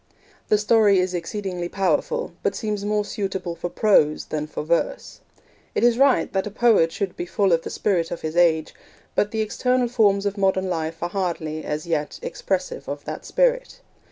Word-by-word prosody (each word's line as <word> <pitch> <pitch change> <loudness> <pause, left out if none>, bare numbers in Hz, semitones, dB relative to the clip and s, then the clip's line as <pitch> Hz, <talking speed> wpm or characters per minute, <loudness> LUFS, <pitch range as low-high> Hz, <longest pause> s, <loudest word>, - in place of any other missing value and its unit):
The 210 - +5
story 210 -1 +4
is 180 0 +1
exceedingly 180 0 -4
powerful, 475 - 0
but - - 0
seems 210 -3 -3
more 210 0 0
suitable 190 -4 -3
for 175 - -4
prose 165 -7 +3
than 150 -1 -3
for 155 - -5
verse. 165 +2 -1 0.6
It - - +1
is 240 0 +4
right 275 -1 +3
that 190 +1 0
a - - -3
poet 210 -6 +3
should 195 -1 -3
be 175 - -5
full 195 +1 +1
of 165 - +2
the - - -6
spirit 175 -5 0
of 170 - -5
his 155 +1 -4
age, 160 -3 +3 0.4
but 205 - +1
the 220 0 -2
external 250 +3 +1
forms 205 -4 +2
of 200 0 -2
modern 190 -1 +1
life 165 0 -3
are 175 - -1
hardly, 170 -5 -3
as 150 +1 -3
yet, 160 -3 -2
expressive - - -3
of - - -5
that - - -6
spirit. - - +1
195 Hz, 185 wpm, -23 LUFS, 170-220 Hz, 0.6 s, The